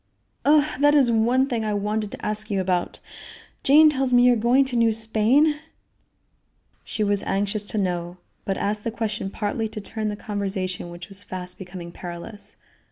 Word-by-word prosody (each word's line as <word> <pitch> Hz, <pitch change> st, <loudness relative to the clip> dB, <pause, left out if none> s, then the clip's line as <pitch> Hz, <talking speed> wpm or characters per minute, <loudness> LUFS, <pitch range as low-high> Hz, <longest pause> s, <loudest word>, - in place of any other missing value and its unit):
"Oh! 295 Hz, 0 st, +5 dB
that 290 Hz, +1 st, +5 dB
is 265 Hz, -5 st, +5 dB
one 235 Hz, +4 st, +3 dB
thing 240 Hz, -5 st, -2 dB
I 210 Hz, -1 st, -1 dB
wanted 210 Hz, +1 st, -2 dB
to -, -, -7 dB
ask 215 Hz, 0 st, 0 dB
you 200 Hz, -2 st, 0 dB
about. 180 Hz, -1 st, -1 dB, 0.6 s
Jane 305 Hz, +3 st, +7 dB
tells 265 Hz, -3 st, +1 dB
me 245 Hz, -, +6 dB
you 250 Hz, -, +6 dB
are -, -, +2 dB
going 240 Hz, +4 st, +3 dB
to 260 Hz, -2 st, -4 dB
New 230 Hz, -1 st, +4 dB
Spain?" 225 Hz, +8 st, +2 dB, 1.2 s
She 215 Hz, -, -2 dB
was 205 Hz, -1 st, +1 dB
anxious 205 Hz, +1 st, -1 dB
to 215 Hz, -, -4 dB
know, 175 Hz, -2 st, -2 dB, 0.3 s
but 195 Hz, -, -2 dB
asked 210 Hz, +1 st, -2 dB
the -, -, -1 dB
question 220 Hz, -3 st, -3 dB
partly 215 Hz, +2 st, -2 dB
to 215 Hz, 0 st, -7 dB
turn 215 Hz, +1 st, -4 dB
the 210 Hz, -, -3 dB
conversation 195 Hz, -4 st, -4 dB
which 175 Hz, 0 st, -9 dB
was 195 Hz, 0 st, -8 dB
fast 180 Hz, 0 st, -7 dB
becoming 180 Hz, -2 st, -8 dB
perilous. 175 Hz, +5 st, -7 dB
215 Hz, 180 wpm, -24 LUFS, 195-235 Hz, 1.2 s, Jane